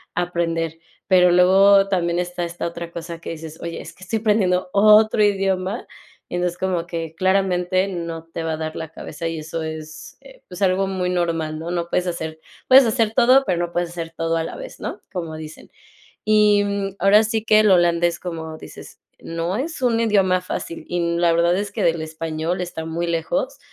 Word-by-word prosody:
aprender. 165 -2 -2 0.3
Pero 180 -2 +5
luego 195 +2 +6
también 175 -2 0
esta 175 0 -3
esta 170 0 -4
otra 170 0 -7
cosa 170 0 -7
que - - -7
dices: 160 -1 -9
"Oye, 170 0 -5
es - - -10
que 185 - -16
estoy 220 +4 -2
aprendiendo 190 -4 +1
otro 215 +1 +5
idioma". 195 +1 0 0.4
Y - - -11
entonces, 180 0 -1
como 180 -2 -2
que 165 -2 -5
claramente 185 0 +1
no 170 -3 -5
te 165 - -3
va 165 -1 -2
a - - -3
dar 160 0 -5
la 160 - -5
cabeza, 165 0 -6
y 165 -1 -3
eso 160 +1 -5
es, 155 0 -8
eh, - - -16
pues, 180 +2 -5
algo 190 +1 +2
muy 180 -1 -2
normal, 165 -3 -1
¿no? 165 +1 -6
No 170 -1 -2
puedes 180 +1 -1
hacer 160 -2 -4 0.3
puedes 265 +1 +8
hacer 225 0 +1
todo, 255 +4 +5
pero 175 -2 0
no 175 0 -2
puedes 175 -1 -1
hacer 165 -1 -6
todo 165 0 0
a 165 - 0
la - - -6
vez, - - -9
¿no?, - - -6
como 165 -3 -4
dicen. 155 0 -10 0.6
Y, 210 -1 +4
mm, 200 -1 -3
ahora 205 +2 +5
sí 220 0 -1
que 215 -1 +5
el 210 -2 +4
holandés, 175 -1 +3
como 160 -3 -6
dices, - - -12 0.2
no 165 +3 -3
es 300 +3 -4
un 240 -3 +2
idioma 195 -5 +2
fácil. 170 -2 -5
Y 175 - -2
n 170 0 0
la 170 -1 +4
verdad 170 +2 +3
es 205 0 -3
que - - -3
del 165 -1 +1
español 160 +2 -3
está 170 -2 -5
muy 165 +2 -3
lejos. 255 - -2
175 Hz, 200 wpm, -21 LUFS, 165-195 Hz, 0.6 s, puedes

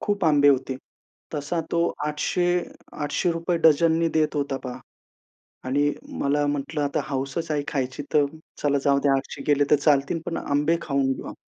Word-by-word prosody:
खूप 205 -3 -1
आंबे 145 -2 +5
होते. 135 -1 +2 0.6
तसा 150 +3 -2
तो 170 0 +2
800 150 +4 0 0.5
₹800 165 +3 -1
डझननी 165 +1 +4
देत 155 -1 0
होता, 140 -1 -1
पहा. 125 -1 -7 0.9
आणि 145 +3 +1 0.3
मला 145 +1 +1
म्हटलं 145 +2 -2
आता 145 -1 0
हौसच 140 +4 -3
आहे 145 -1 0
खायची, 135 0 -2
तर 150 -1 +5 0.4
चला 145 -1 +2
जाऊ 140 -1 +4
ते 145 - +3
800 135 +1 -4
गेले 145 -1 +4
तर - - +8
चालतील, 145 +2 +2
पण 165 - -3
आंबे 150 +4 +1
खाऊन 140 -3 0
घेऊ. - - -7
145 Hz, 155 wpm, -24 LUFS, 140-160 Hz, 0.9 s, तर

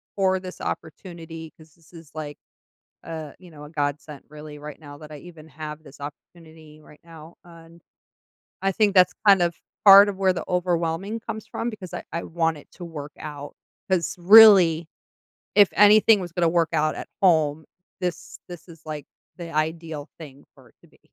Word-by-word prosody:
for 190 -1 +1
this 185 0 -10
opportunity 165 -1 -7
'cause 155 -1 -19
this 165 0 -25
is, 165 -3 -14
like, 150 -2 -7 0.7
uh, 160 -3 -8
you 180 -2 -16
know, 150 -2 -12
a 150 - -12
godsent 145 -1 -4
really 150 0 -11
right 150 0 -10
now 145 -2 -12
that 155 0 -12
I 150 - -9
even 160 -1 -14
have 150 +1 -9
this 145 -2 -16
opportunity 155 +1 -13
right 150 0 -19
now, 165 0 -14
and 170 -1 -17 0.8
I 195 - +1
think 210 -1 +2
that's 180 -1 +5
kind 195 -3 +6
of 170 -1 0 0.3
part 200 +1 +9
of 195 - -6
where 190 -1 +2
the 180 - -6
overwhelming 180 +3 -2
comes 220 -1 -7
from 230 - -4
because 205 -6 -10
I - - -6
I 170 - -4
want 165 -1 -1
it 145 - -17
to 175 - -10
work 150 -3 -8
out. 145 -2 -9 0.3
'Cause 185 -2 -1
really, 180 -4 +7 0.7
if 205 -2 +6
anything 210 +1 +6
was 175 -3 -7
gonna 175 -1 +1
work 165 -1 +1
out 155 -1 0
at - - -8
home, 160 -4 +2 0.3
this 180 -3 -5
this 175 -2 -11
is, 165 -1 -16
like, 150 -2 -7 0.3
the 170 -2 -8
ideal 155 -1 -4
thing 140 -4 -13
for - - -20
it - - -31
to - - -21
be. - - -28
165 Hz, 185 wpm, -23 LUFS, 155-180 Hz, 0.8 s, part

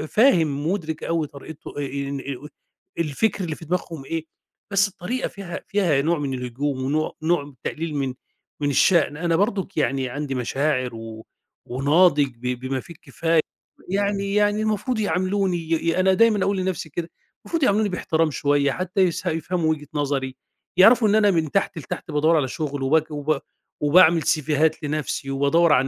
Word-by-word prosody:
فاهم، 165 - +3
مُدرك 160 -5 -3
أوي 165 -2 0
طريقته 145 +2 -10
آآ 145 - -2 0.3
إن 140 0 -3
آآ 140 +1 -6 0.5
الفِكْر 175 +6 0
اللي 160 -3 -3
في 165 - -12
دماغهم 165 -4 -3
إيه، 165 +1 -3 0.5
بس 200 +1 +4
الطريقة 205 +7 -3
فيها 195 -4 -7
فيها 180 -9 +2
نوع 165 +2 +1
من 140 -2 -2
الهجوم 130 +2 -3
ونوع 150 +4 0
نوع 165 -2 +2
من 145 - -13
تقليل 160 -1 -3
من 135 -2 -1 0.5
من 145 - +1
الشأن. 150 +1 +3
أنا 165 0 +1
برضُك 195 0 -1
يعني 135 -2 0
عندي 145 +1 -4
مشاعر 130 0 -1
و 115 -1 -9 0.4
وناضج 145 +3 +4
ب - - -26 0.2
بما 130 +1 -2
فيه 170 +6 -11
الكفاية 165 +1 0 0.5
يعني 200 0 0
يعني 210 0 +2
المفروض 220 +2 -1
يعاملوني 185 0 0
ي 165 -1 -7 0.2
يا 165 - +1
أنا 190 0 +4
دايمًا 215 -1 +4
أقول 200 0 +1
لنَفْسي 185 -4 -2
كده، 165 +3 -4 0.4
مفروض 330 -3 -1
يعاملوني 210 -3 +3
بإحترام 165 -3 0
شوية 145 -1 +1
حتّى 185 +5 -1
يسه 180 0 +1
يفهموا 165 0 -1
وِجهة 150 -2 -4
نظري، 135 -3 -1 0.4
يعرفوا 220 +4 +7
إن 205 - +3
أنا 210 -2 +5
من 160 -4 0
تحت 195 -2 0
لتحت 155 +4 -6
بادوّر 155 +3 +3
على 135 - +1
شُغل 145 0 -4
وبك 155 +3 +2
وب 150 0 -1 0.4
وباعمل 165 +2 +6
سيفيهات 155 +1 +1
لنَفْسي 150 -1 -3
وبادوّر 145 +4 +3
على 135 -1 +3
160 Hz, 170 wpm, -23 LUFS, 145-185 Hz, 0.5 s, يعرفوا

